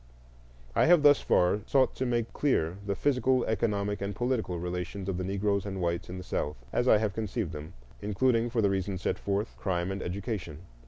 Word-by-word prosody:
I - - +4
have 170 -3 +6
thus 145 -1 +6
far 90 +4 +3
sought 135 -2 +3
to 130 - -1
make 120 -2 -1
clear 90 - +1
the 100 0 -2
physical, 130 -1 +2
economic, 105 -2 -1
and 100 0 -3
political 120 -8 -1
relations 90 +2 -4
of 95 -2 -2
the - - -1
Negroes 100 +1 0
and 95 -2 -5
whites 85 -1 -1
in 90 - -6
the 95 - -6
South, 75 -5 -2 0.2
as 125 - +1
I 110 - +7
have 105 -2 -1
conceived 110 -4 -3
them, 75 +3 -8 0.3
including, 115 +3 +1
for 115 -2 0
the 100 - +4
reasons 95 -1 -2
set - - 0
forth, 100 +2 -2
crime 90 -1 -1
and 95 0 -4
education. 90 -4 -4
100 Hz, 200 wpm, -29 LUFS, 90-115 Hz, 0.3 s, I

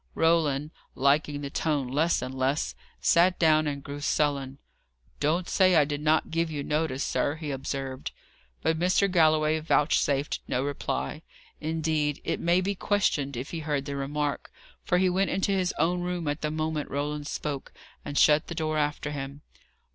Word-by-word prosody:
Roland, 155 -3 +2 0.2
liking 145 +2 +2
the 140 -1 -5
tone 145 -5 0
less 150 +2 +1
and 130 +1 -5
less, 135 +3 0 0.3
sat 175 +2 +4
down 155 -2 +4
and 140 -1 -3
grew 145 +1 -6
sullen. 140 -3 0 0.6
"Don't 165 +5 +1
say 185 -2 +4
I 150 -3 +6
did 145 0 -3
not 155 +1 +2
give 165 0 0
you 145 -2 -4
notice, 150 -2 -1
sir," 145 - 0
he 155 -2 -5
observed. 135 -1 -4 0.5
But 160 0 +1
Mr. 185 +3 +3
Galloway 155 -2 +3
vouchsafed 150 -2 +1
no 125 - 0
reply. 100 - -3 0.4
Indeed, 155 -2 -1
it - - -2
may 175 +2 +3
be 200 +2 -1
questioned 155 - 0
if 130 +4 -5
he 165 - -3
heard 145 -3 -2
the 140 -1 -4
remark, 145 +1 -2 0.3
for 180 - +2
he 185 +1 +3
went 190 +2 +1
into 195 +1 0
his 185 -2 +1
own 175 +3 +1
room 175 -2 -3
at 145 +1 -2
the 150 - -1
moment 155 -1 -2
Roland 145 +1 -3
spoke, 145 -3 -4 0.3
and 145 -1 -5
shut 150 0 +5
the 170 - -5
door 155 -1 -1
after 150 0 -1
him. 140 0 -6
150 Hz, 170 wpm, -27 LUFS, 140-165 Hz, 0.6 s, I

